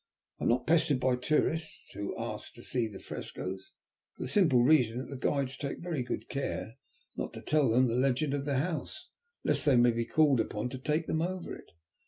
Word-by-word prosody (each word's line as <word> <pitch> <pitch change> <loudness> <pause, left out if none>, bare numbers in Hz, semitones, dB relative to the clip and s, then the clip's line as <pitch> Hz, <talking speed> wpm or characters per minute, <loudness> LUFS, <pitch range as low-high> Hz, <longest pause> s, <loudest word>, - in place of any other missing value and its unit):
I - - -2
am - - +3
not 120 +1 +2
pestered 155 -4 +3
by 125 0 +2
tourists 155 +4 -1
who 100 - -4
ask 115 -2 -5
to 120 - -11
see 120 -3 0
the 100 -3 -9
frescoes, 95 +1 -6 0.4
for - - -4
the - - -3
simple 140 -10 +4
reason 125 -5 +4
that 130 +3 -5
the - - -4
guides 135 0 0
take 140 -2 -4
very 170 -6 -3
good 125 - -4
care - - -4 0.4
not - - -4
to - - -8
tell 150 -4 +3
them 125 +3 +4
the 115 - 0
legend 135 +3 +1
of 140 -1 -2
the 140 -2 0
house, 160 +3 -3 0.3
lest - - +1
they 145 -3 +4
may 120 0 +6
be 115 0 -1
called 150 -5 +4
upon 105 +2 -1
to 130 - -6
take 150 +4 0
them 160 - 0
over 180 +1 -3
it. - - -14
130 Hz, 215 wpm, -31 LUFS, 120-155 Hz, 0.4 s, may